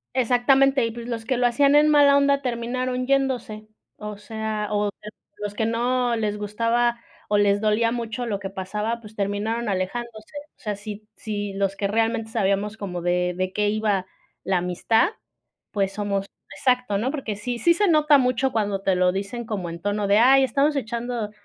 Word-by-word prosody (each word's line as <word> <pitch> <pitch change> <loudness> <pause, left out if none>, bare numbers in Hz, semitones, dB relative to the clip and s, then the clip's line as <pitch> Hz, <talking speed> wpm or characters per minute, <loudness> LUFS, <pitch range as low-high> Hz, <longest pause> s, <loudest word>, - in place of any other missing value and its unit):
Exactamente, 265 +1 +3
y 230 - -2
pues, 235 +1 -8
los 230 -2 -4
que 255 0 0
lo 245 0 +3
hacían 280 +4 +3
en 300 +1 +6
mala 290 -2 +6
onda 280 0 +3
terminaron 250 +1 -2
yéndose, 250 -6 -1 0.3
o 210 -1 -7
sea, 215 0 -4
o 205 -1 0 0.5
los 205 0 -5
que 220 - 0
no 240 +1 +1
les 210 -2 -1
gustaba, 230 +3 0 0.3
o 205 - +3
les 205 0 +3
dolía 220 +2 +2
mucho 235 0 -3
lo 205 -3 -2
que 195 -1 -6
pasaba, 210 +5 -3
pues, 215 -1 -13
terminaron 210 +3 -2
alejándose, 215 +6 -4 0.2
o - - -42
sea, 210 -4 -3
si 210 +1 -9
si 205 -2 -4
los 195 0 -1
que 200 0 -1
realmente 225 +1 0
sabíamos 205 0 0
como 180 -4 -5
de 180 +1 0
de 185 0 -2
qué 210 0 +1
iba 210 -3 0 0.4
la 190 -1 +1
amistad, 180 +5 +2 0.6
pues, 195 -1 -1
somos 200 -1 -2 0.3
exacto, 250 -6 +1
¿no?, 250 +4 0
porque, 270 -8 -4
sí 240 +4 -4
sí 340 +7 +4
se 410 +3 +1
nota 300 -3 +5
mucho 255 +1 +1
cuando 205 -4 -1
te 190 - +2
lo 180 0 +3
dicen 200 +5 -4
como 185 -6 -3
en 170 0 -8
tono 205 +1 -1
de: 200 +2 +4
"Ay 270 +3 +6
estamos 280 +4 +2
echando 235 -3 -3
220 Hz, 185 wpm, -24 LUFS, 205-245 Hz, 0.6 s, en